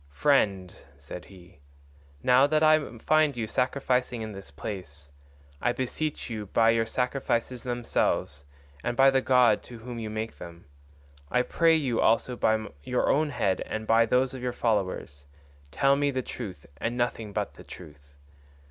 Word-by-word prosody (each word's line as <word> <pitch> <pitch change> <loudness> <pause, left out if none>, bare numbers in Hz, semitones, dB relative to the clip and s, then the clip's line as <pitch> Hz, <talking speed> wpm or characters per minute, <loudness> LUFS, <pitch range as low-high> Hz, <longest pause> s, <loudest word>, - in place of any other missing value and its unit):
"Friend," 95 - +1 0.2
said 70 +5 -9
he, 90 -5 -17 0.6
"now 125 +2 +5
that 155 +1 +2
I 155 -6 +3
find 155 +2 +2
you 115 - -1
sacrificing 125 -1 0
in 110 - -6
this 95 -4 -9
place, 75 -3 -8 0.5
I 120 - +1
beseech 145 +5 -3
you 110 -3 -5
by 115 +3 +4
your 115 0 +1
sacrifices 125 -1 -1
themselves, 120 - -1 0.4
and 120 - -2
by 135 0 +6
the 135 0 +2
god 125 -4 +4
to 120 - -10
whom 120 +1 -7
you 110 -1 -4
make 110 +1 -5
them, 85 0 -11 0.6
I 125 0 +2
pray 165 +4 +3
you 135 -7 0
also 120 +2 +2
by 110 -2 +1 0.2
your 125 - 0
own 155 +1 +2
head 95 -9 0
and 110 0 -4
by 115 +1 +4
those 130 +1 +2
of 130 - -7
your 125 -1 -2
followers 95 - -2 0.4
tell 140 - +3
me 145 0 +1
the 130 -2 -2
truth 95 - -7
and 115 +9 -3
nothing 115 -3 -2
but - - -3
the - - -13
truth. 75 -4 -13
115 Hz, 165 wpm, -27 LUFS, 100-130 Hz, 0.6 s, by